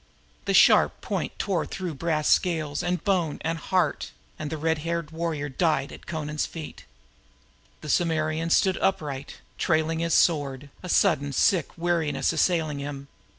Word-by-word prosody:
The - - +1
sharp - - +6
point - - -3
drove 185 -6 -1
through 180 -4 -4
brass 155 +1 -1
scales 155 -5 +1
and 175 -1 -2
bones 180 -7 +1
and 165 0 -2
heart, 185 +1 0 0.3
and 150 - -4
the 160 - -4
red 160 0 0
haired 165 0 -3
warrior 160 -3 -2
died 150 0 0
at - - -10
Amra's 150 -2 -2
feet. 160 -3 -9 1.0
Amra 160 0 0
stood 190 +2 +3
swaying, 145 -7 -1 0.3
trailing 160 0 +1
his 170 -1 +1
sword, 145 -4 +1
a 180 - -7
sudden 150 -7 +3
sick 175 +7 +1
weariness 170 -2 0
assailing 160 -3 +1
him. 140 -1 -6
160 Hz, 145 wpm, -26 LUFS, 150-170 Hz, 1.0 s, sharp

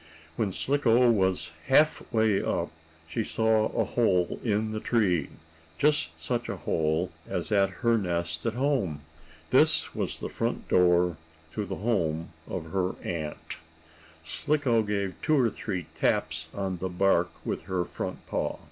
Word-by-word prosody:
When 105 0 0
Slicko 125 0 +3
was 95 -5 +1 0.2
half 150 +3 +4
way 110 -3 +3
up, 85 -1 -1 0.4
she 110 +8 -2
saw 110 0 +2
a - - 0
hole 95 -7 +1
in 110 -1 0
the 110 - -2
tree, 95 - +1 0.5
just 150 - +2
such 120 +9 -2
a 100 - -3
hole 80 +1 0 0.2
as - - -3
at 100 -2 +4 0.2
her 115 -1 +4
nest 85 -4 -2
at 115 - -1
home. 125 - 0 0.5
This - - +4
was - - -2
the - - -4
front - - -3
door 90 -2 +4 0.4
to 105 - -2
the 95 0 -4
home 85 -7 0 0.2
of 80 -4 -5
her 95 -1 0
aunt. 80 -3 -5 0.7
Slicko 130 - +1
gave 100 -3 -1
two 155 -2 +3
or 120 -4 +3
three 95 -6 -4
taps 80 0 0
on 95 -2 -3
the 95 - -2
bark 90 -1 +2 0.2
with - - -2
her 90 -2 -1
front - - -6
paw. - - -2
95 Hz, 150 wpm, -28 LUFS, 85-115 Hz, 0.7 s, half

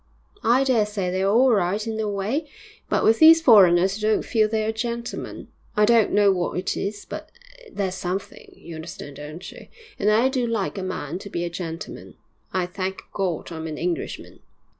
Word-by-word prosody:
'I 250 +4 +4
dare 245 -6 +3
say 195 -4 -2
they're 190 +1 +1
all 245 +5 +5
right 200 0 +1
in 225 -1 -3
their 220 -1 -1
way, 215 +10 -2 0.4
but - - +1
with 225 +1 +4
these 325 +1 +9
foreigners 195 - +5
you 215 - +1
don't 215 - +1
feel 220 -3 +2
they're 220 0 0
gentlemen. 235 +1 -5 0.3
I 210 - +5
don't 230 -1 +4
know 205 -1 +4
what 180 -2 -1
it 185 - -2
is, 205 +1 -4
but - - -8 0.4
there's 190 - -2
something, 185 +1 -5
you 170 - -11
understand, 160 -3 -8
don't 155 +5 -8
you? - - -13 0.3
And 210 - +2
I 225 +4 +4
do 260 -2 -1
like 210 -3 -2
a - - -3
man 180 -3 -4
to 200 - -9
be 170 -2 -3
a 170 - -3
gentleman. 165 +1 -7 0.4
I 185 -1 0
thank 190 +1 -5
God 180 -4 -2
I'm 160 -1 -5
an 155 -1 -5
Englishman!' 175 0 -4
200 Hz, 190 wpm, -23 LUFS, 180-225 Hz, 0.4 s, these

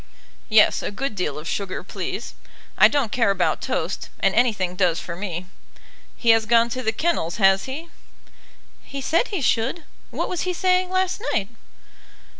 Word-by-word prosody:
"Yes, 215 -1 +5
a - - -3
good 250 +4 -3
deal 180 -7 -2
of 155 +2 -7
sugar, 195 -1 -3
please. - - -5 0.4
I - - +8
don't 280 -7 0
care 240 -6 +2
about 190 -3 +1
toast, - - -3
and - - +2
anything 210 -7 +1
does 180 -3 +2
for 170 - -6
me. 180 -2 -5 0.7
He 235 - +4
has 225 -1 +3
gone 235 +1 +4
to 255 +2 -3
the 220 - 0
kennels, 220 - -1
has 195 -2 +4
he?" 305 +6 -6 0.9
"He 275 - -7
said 330 - +1
he 390 -7 -3
should. 245 +7 0 0.3
What - - -3
was 360 - -3
he 365 - -1
saying 365 0 +1
last 375 +1 0
night?" 205 -3 0
225 Hz, 170 wpm, -23 LUFS, 195-305 Hz, 0.9 s, I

